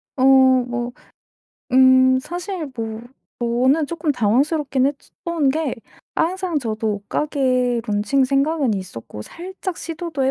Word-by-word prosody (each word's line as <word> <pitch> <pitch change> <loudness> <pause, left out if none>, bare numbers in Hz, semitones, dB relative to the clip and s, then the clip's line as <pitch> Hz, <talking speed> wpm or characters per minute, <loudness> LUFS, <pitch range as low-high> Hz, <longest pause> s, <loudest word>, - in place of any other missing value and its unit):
어 260 - 0 0.4
뭐 240 0 -3 0.8
음 260 0 +6
사실 350 0 -5
뭐 225 -1 -4 0.4
저는 255 +6 +2
쪼끔 315 -1 -1
당황스럽긴 265 +4 +1
했으 285 0 -5
던 335 -5 +1
게 305 -2 -1 0.4
항상 360 -1 0
저도 220 -3 -2
옷가게 255 +2 0
론칭 215 +6 +1
생각은 275 -1 +1
있었고 115 - -7
살짝 370 - -7
시도도 330 -3 -4
해 265 - +3
270 Hz, 235 characters per minute, -21 LUFS, 240-320 Hz, 0.8 s, 음